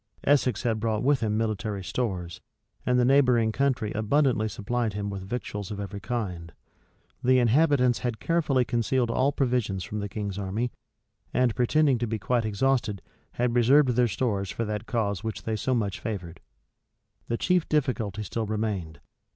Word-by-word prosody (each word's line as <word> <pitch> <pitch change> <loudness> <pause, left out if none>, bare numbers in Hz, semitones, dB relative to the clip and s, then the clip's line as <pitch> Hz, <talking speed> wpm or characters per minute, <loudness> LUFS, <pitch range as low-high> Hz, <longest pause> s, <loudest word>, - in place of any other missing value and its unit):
Essex 130 -6 +2
had 115 -2 0
brought 110 0 -1
with 140 +1 +3
him 110 -2 0
military 110 -2 -2
stores; 95 -3 -3 0.5
and 125 0 +3
the 125 - +4
neighboring 125 -4 +4
country 130 -4 0
abundantly 110 0 +2
supplied 110 +2 -2
him 100 0 -3
with 100 -1 -5
victuals 105 -1 -5
of 105 - -5
every 100 0 -5
kind. 95 -6 -4 0.7
The 130 +1 +5
inhabitants 125 0 +3
had 120 -4 -3
carefully 150 -6 +1
concealed 120 +1 0
all 135 +4 +2
provisions 120 -9 0
from 105 - -5
the 100 0 -4
king's 100 -1 -4
army, 105 +5 -2 0.6
and, 125 -3 +3
pretending 135 +1 +3
to 120 - -1
be 110 +1 -2
quite 120 +2 0
exhausted, 110 -2 0 0.3
had 120 0 0
reserved 130 +4 +5
their 125 0 +3
stores 100 -2 -1
for 115 - -3
that 105 +1 -4
cause 100 -6 -1
which 110 -1 -4
they 110 - -1
so 130 +4 0
much 105 -1 -1
favored.[] 90 -7 -5 0.9
The 115 - -1
chief 180 +2 +1
difficulty 115 -8 0
still 110 +2 -3
remained. 100 -8 -3
115 Hz, 165 wpm, -27 LUFS, 105-125 Hz, 0.9 s, The